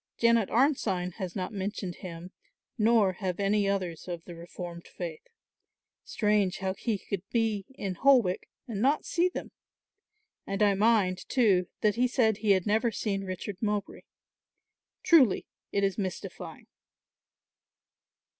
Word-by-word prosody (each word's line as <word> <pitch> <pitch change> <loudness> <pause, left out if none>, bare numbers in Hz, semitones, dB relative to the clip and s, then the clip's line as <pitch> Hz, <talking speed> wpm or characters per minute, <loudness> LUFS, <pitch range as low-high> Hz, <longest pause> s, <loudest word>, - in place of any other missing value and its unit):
"Janet 230 -3 +3
Arnside 215 - +1
has 185 -5 -5
not 185 +1 -3
mentioned 195 -2 -4
him 175 0 -8 0.4
nor 215 -3 +3
have 185 -1 -4
any 200 0 +2
others 185 -5 -3
of 175 -2 -6
the 175 - -9
reformed 170 0 -8
faith. 475 -2 -6 0.8
Strange 210 -4 +1
how 190 0 -2
he 215 +2 -2
could 195 -1 -4
be 220 -4 0
in 195 -6 -3
Holwick 240 -4 +3 0.2
and 215 -4 -4
not 280 +5 +2
see 350 +2 +2
them. - - -7 1.0
And 195 +1 0
I 205 -1 +5
mind 200 -3 +2
too, 200 -8 +3
that 210 0 +2
he 250 +1 +3
said 225 -4 +2
he 210 -2 +3
had 185 -2 0
never 220 +3 +2
seen 200 -3 -2
Richard 185 +1 -5
Mowbray. 210 -2 -2 1.0
Truly 275 - +5 0.3
it 200 - 0
is 195 +1 0
mystifying." 190 -2 -6
200 Hz, 135 wpm, -29 LUFS, 185-225 Hz, 1.0 s, I